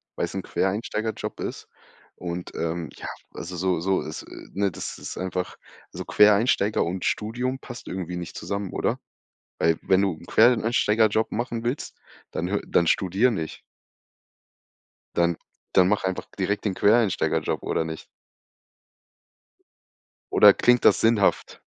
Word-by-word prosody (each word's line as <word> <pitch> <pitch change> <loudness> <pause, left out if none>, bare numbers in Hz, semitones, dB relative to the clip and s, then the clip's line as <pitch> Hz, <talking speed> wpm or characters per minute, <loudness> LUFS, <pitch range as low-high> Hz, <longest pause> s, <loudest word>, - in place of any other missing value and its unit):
weil's - - -2
'n - - -2
Quereinsteigerjob 105 +3 -2
ist - - -5 0.5
und, 90 0 -5
ähm, 85 0 -2
ja, - - -8 0.3
also 90 +2 -7
so 90 0 +1
so 95 +3 +1
ist, 80 - -7 0.3
ne, 100 0 +1
das - - -6
ist - - -7
einfach, 90 0 -3 0.4
also - - -5
Quereinsteiger 105 0 +4
und 90 +2 -3
Studium 125 +5 -1
passt 120 -2 -10
irgendwie 90 -1 -4
nicht 85 -1 -7
zusammen, 100 +2 -4
oder? - - -1 0.6
Weil 80 0 +3
wenn 95 +1 +3
du 95 -2 +1
'n 80 +2 -14
Quereinsteigerjob 110 -2 +3
machen 120 0 -3
willst, 125 +5 -3 0.3
dann 85 - -3
hö 100 +2 0
dann 85 - +3
studier 95 +9 +3
nicht. 80 -7 -4 1.6
Dann 85 -1 +2 0.4
dann 90 -1 +6
mach 105 +1 +1
einfach 95 -1 -2
direkt 100 +2 -1
den 100 - +1
Quereinsteigerjob 105 0 +2
oder 80 - -1
nicht? 80 0 -7 2.3
Oder 105 -1 +8
klingt 125 0 +4
das - - +6
sinnhaft? 110 -3 +2
100 Hz, 135 wpm, -25 LUFS, 90-110 Hz, 2.3 s, Oder